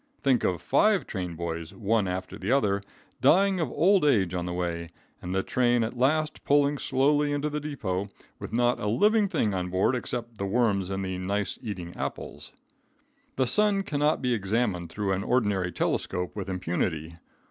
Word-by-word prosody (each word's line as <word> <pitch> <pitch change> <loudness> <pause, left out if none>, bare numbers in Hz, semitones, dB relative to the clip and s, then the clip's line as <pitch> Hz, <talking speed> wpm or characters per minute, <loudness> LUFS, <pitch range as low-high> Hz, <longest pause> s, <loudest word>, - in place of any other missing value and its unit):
Think 135 -3 +3
of 90 -2 0
five 205 - +3
train 90 -3 -4
boys, 85 -1 -5
one 110 -2 +1
after 90 +1 -4
the 95 +5 -2
other, 100 -8 +2 0.4
dying 195 +2 +4
of 160 -6 0
old 190 +7 +3
age 100 - +3
on 90 -1 -2
the - - -3
way, 85 -1 -3 0.3
and 90 +1 -4
the 95 - +1
train 120 -2 +2
at 110 - -3
last 155 +5 +1
pulling 145 0 +3
slowly 145 +2 +2
into 145 +1 -1
the 150 - -2
depot 105 -11 -3 0.3
with - - -7
not 120 +1 +2
a 105 - -2
living 210 - +3
thing 105 - 0
on 90 -1 -2
board 95 +7 +2
except 120 -2 -5
the 100 - -1
worms 100 -4 +1
in 95 0 -2
the 95 -1 -3
"nice 100 +2 -2
eating 90 -7 -6
apples!" - - -6 0.8
The 130 - +2
sun 205 - +2
cannot 150 -5 0
be 125 -1 +2
examined 100 -4 -1
through 100 0 -2
an 95 0 0
ordinary 105 -8 +1
telescope 90 0 -2
with 100 -2 -5
impunity. 85 -3 -2
105 Hz, 180 wpm, -27 LUFS, 95-140 Hz, 0.8 s, dying